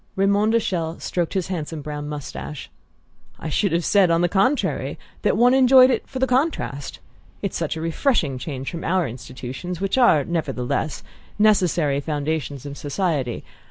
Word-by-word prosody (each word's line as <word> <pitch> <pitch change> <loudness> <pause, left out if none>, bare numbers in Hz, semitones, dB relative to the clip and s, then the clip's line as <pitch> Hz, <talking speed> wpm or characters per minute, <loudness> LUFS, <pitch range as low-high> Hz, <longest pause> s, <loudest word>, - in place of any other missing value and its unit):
Raymond 200 +3 +2
de 230 - +5
Chelles 170 -6 -3
stroked 175 +1 -2
his 185 -1 -1
handsome 160 -4 -4
brown 150 0 -5
moustache. 150 0 -7 0.7
"I 160 - -5
should 200 +6 +1
have 170 0 0
said, 195 -3 +4
on 165 0 +3
the 175 - +3
contrary, 205 - 0 0.2
that - - +2
one 245 +2 +5
enjoyed 260 0 +7
it - - -1
for 265 - -6
the 260 - +2
contrast. 255 - -1 0.5
It's 200 - -2
such 165 -1 -2
a - - -4
refreshing 165 - 0
change 135 0 -5
from 165 - -6
our 180 -1 +1
institutions 130 +8 -7
which 195 +6 0
are, 155 - +5
nevertheless, 150 -3 -2 0.4
the 210 - +2
necessary 175 -9 +3
foundations 145 -2 -3
of 140 0 -7
society. 145 -5 -2
165 Hz, 165 wpm, -22 LUFS, 145-200 Hz, 0.7 s, enjoyed